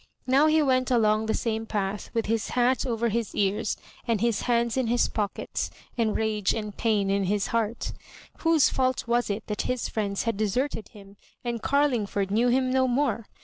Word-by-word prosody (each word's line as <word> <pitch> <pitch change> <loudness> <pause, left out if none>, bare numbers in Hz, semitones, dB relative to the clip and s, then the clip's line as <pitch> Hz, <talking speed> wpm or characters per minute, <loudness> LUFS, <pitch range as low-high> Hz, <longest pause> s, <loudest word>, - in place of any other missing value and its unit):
Now 275 +4 +4
he 310 0 +4
went 255 -2 +2
along 220 -3 +2
the 220 - +1
same 225 -1 -2
path 205 -1 -2
with 230 -2 -1
his 225 0 0
hat 250 +2 +1
over 235 -1 0
his 225 0 -2
ears 200 +1 0 0.3
and 230 -3 +1
his 235 0 +1
hands 235 -1 +2
in 260 -3 0
his 240 +1 +2
pock 210 -2 -2
ets, - - -3 0.3
and 225 -3 +1
rage 215 -3 0
and 210 -2 -5
pain 205 -4 +1
in 200 0 +1
his 200 +1 0
heart 230 0 -1 0.5
"Whose 325 -3 +4
fault 255 -2 0
was 240 0 +1
it 205 +2 -3
that 210 - -2
his 250 -1 -1
friends 200 -3 -2
had 230 -3 -1
deserted 220 +2 -1
him 200 -1 -15 0.3
and 235 -2 -3
Carlingford 230 -9 +1
knew 230 +4 +3
him 255 +1 +2
no 260 0 +3
more 245 -4 0
230 Hz, 190 wpm, -26 LUFS, 210-250 Hz, 0.5 s, Now